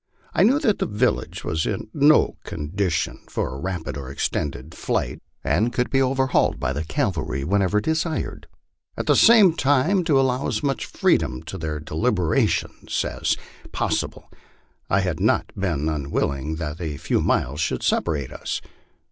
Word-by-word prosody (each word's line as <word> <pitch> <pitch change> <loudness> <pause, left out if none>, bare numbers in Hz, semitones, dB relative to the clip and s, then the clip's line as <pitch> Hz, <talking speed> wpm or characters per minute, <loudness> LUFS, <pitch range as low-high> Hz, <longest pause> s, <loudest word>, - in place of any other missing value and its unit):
I - - +2
knew 240 +9 +5
that 265 -10 +1
the - - 0
village 110 +4 -1
was 80 0 -1
in - - -3
no 150 +1 +4
condition 80 +1 -2
for 60 - -2
a 65 - -6
rapid 90 -1 -4
or 65 -2 -6
extended 70 +1 -3
flight, - - -2 0.2
and 115 +3 +1
could 125 0 -1
be 135 - +3
overhauled 130 0 +2
by 65 - -1
the 75 +3 -2
cavalry 70 -3 -1
whenever 100 +4 +2
desired; 160 +6 -2 0.5
at - - -2
the - - +4
same 220 -7 +7
time, 150 +6 +2
to 145 -5 +4
allow 130 0 +1
as - - -2
much 140 -2 -1
freedom 65 - +1
in 95 - -5
their 80 -1 -3
deliberations 85 +3 0
as - - -1 0.4
possible, - - -2 0.6
I 100 - +3
had 90 -4 -2
not - - +1
been 85 -6 -1
un 75 -3 -2
willing 70 +3 -1
that 80 0 -5
a 75 -4 -3
few - - 0
miles 75 +5 0
should 80 - -1
separate 75 -5 0
us. - - -4
95 Hz, 160 wpm, -23 LUFS, -, 0.6 s, same